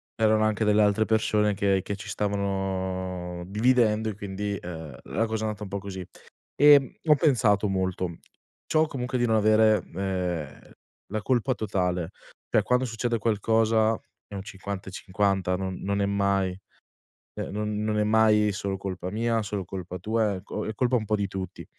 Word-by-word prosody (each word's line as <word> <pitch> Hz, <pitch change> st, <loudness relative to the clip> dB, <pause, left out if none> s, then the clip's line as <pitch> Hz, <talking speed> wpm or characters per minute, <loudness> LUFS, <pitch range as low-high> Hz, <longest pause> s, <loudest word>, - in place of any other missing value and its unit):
c'erano 110 Hz, -1 st, +3 dB
anche 110 Hz, 0 st, +1 dB
delle 105 Hz, 0 st, +4 dB
altre 105 Hz, +1 st, +3 dB
persone 105 Hz, -2 st, +2 dB
che 100 Hz, -1 st, +2 dB
che 100 Hz, -, -4 dB
ci 95 Hz, 0 st, -10 dB
stavano 95 Hz, -3 st, -2 dB
dividendo 110 Hz, 0 st, +2 dB
e -, -, -3 dB
quindi, 100 Hz, 0 st, -4 dB
uhm, 80 Hz, -6 st, -7 dB
la 115 Hz, -, -1 dB
cosa 110 Hz, 0 st, -3 dB
è -, -, 0 dB
andata 105 Hz, -1 st, -4 dB
un 100 Hz, -, -7 dB
po' 100 Hz, +1 st, -3 dB
così. 95 Hz, -2 st, -7 dB, 0.5 s
Ehm, 145 Hz, -2 st, +6 dB
ho 150 Hz, -1 st, +6 dB
pensato 115 Hz, -, +3 dB
molto. 95 Hz, -3 st, -2 dB, 0.5 s
Ciò 155 Hz, 0 st, +3 dB
comunque 130 Hz, -3 st, -3 dB
di 120 Hz, -, +2 dB
non 110 Hz, -1 st, +2 dB
avere, 110 Hz, 0 st, +5 dB
uhm, 90 Hz, -6 st, -4 dB, 0.3 s
la 110 Hz, +1 st, -3 dB
colpa 130 Hz, 0 st, +1 dB
totale. 90 Hz, -4 st, -1 dB, 0.4 s
Per -, -, +3 dB
quando 125 Hz, +1 st, +1 dB
succede 115 Hz, 0 st, -1 dB
qualcosa 110 Hz, 0 st, +2 dB, 0.3 s
è 100 Hz, -, -9 dB
un 95 Hz, -, -5 dB
50 95 Hz, -1 st, -6 dB
e -, -, -11 dB
50, 95 Hz, -1 st, 0 dB
non 95 Hz, 0 st, -3 dB
non 100 Hz, 0 st, -1 dB
è -, -, +2 dB
mai 100 Hz, -2 st, +1 dB, 0.8 s
cioè -, -, -5 dB
non 105 Hz, 0 st, -2 dB
non 110 Hz, 0 st, 0 dB
è 105 Hz, -, +3 dB
mai 105 Hz, -1 st, +4 dB
solo 100 Hz, -1 st, -3 dB
colpa 95 Hz, -2 st, -5 dB
mia, 115 Hz, +1 st, 0 dB
solo 100 Hz, -2 st, -3 dB
colpa 90 Hz, -1 st, -6 dB
tua, 110 Hz, 0 st, 0 dB
è 95 Hz, -, -7 dB
co 105 Hz, -, -5 dB
è 110 Hz, -, -3 dB
colpa 125 Hz, +3 st, +1 dB
un 110 Hz, -, -3 dB
po' 105 Hz, +1 st, +1 dB
di 100 Hz, -1 st, -1 dB
tutti. 95 Hz, -2 st, -6 dB
105 Hz, 180 wpm, -26 LUFS, 95-110 Hz, 0.8 s, Ehm